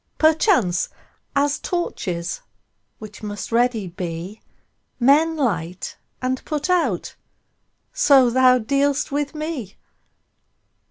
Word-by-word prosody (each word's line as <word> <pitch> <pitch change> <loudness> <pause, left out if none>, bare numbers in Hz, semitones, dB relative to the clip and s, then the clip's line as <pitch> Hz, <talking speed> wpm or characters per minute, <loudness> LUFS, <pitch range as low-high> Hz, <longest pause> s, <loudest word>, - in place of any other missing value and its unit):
Perchance, 310 - +3 0.5
as 285 +1 +2
torches, 180 - -3 0.6
which 215 -2 -11
must 205 +1 -6
ready 235 -3 +2
be, 175 +3 -6 0.6
Men 305 +6 +4
light 180 - -2 0.3
and 255 0 -1
put 300 +3 -2
out, 290 - 0 0.8
so 275 - +5
thou 255 0 +5
dealst 280 +5 0
with 290 +2 -2
me. 305 - -5
255 Hz, 95 wpm, -22 LUFS, 205-295 Hz, 0.8 s, so